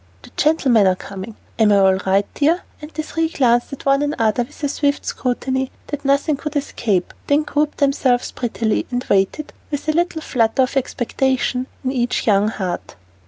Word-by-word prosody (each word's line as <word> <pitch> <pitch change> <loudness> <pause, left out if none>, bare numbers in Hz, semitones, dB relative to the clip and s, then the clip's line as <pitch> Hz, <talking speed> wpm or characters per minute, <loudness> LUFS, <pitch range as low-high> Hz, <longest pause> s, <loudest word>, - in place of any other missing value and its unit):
The - - -14
gentlemen 260 -9 +3
are 185 - +3
coming! 195 +3 -8 0.2
Am 215 -2 +5
I 200 - +5
all 190 -1 +5
right, 195 +1 +3
dear?" 320 +5 +2 0.2
And 300 - -8
the 310 0 -4
three 325 +1 -1
glanced 240 -6 +2
at 275 - -8
one 275 0 +3
another 245 -6 +1
with 240 +5 -8
a - - +3
swift 285 0 0
scrutiny 260 +1 -1 0.2
that 290 -1 -4
nothing 280 +2 +2
could 300 +1 -6
escape, 215 -9 -1
then 290 +2 +3
grouped 300 0 -1
themselves 275 -3 +1
prettily, 230 -3 -1
and 245 0 -2
waited, 200 +10 +1 0.2
with 290 0 -4
a - - +4
little 335 -1 0
flutter 230 +1 +2
of 255 - -3
expectation 260 0 0 0.2
in 260 - 0
each 245 -2 -1
young 205 -1 +4
heart. 185 -5 -4
260 Hz, 180 wpm, -20 LUFS, 225-290 Hz, 0.2 s, Am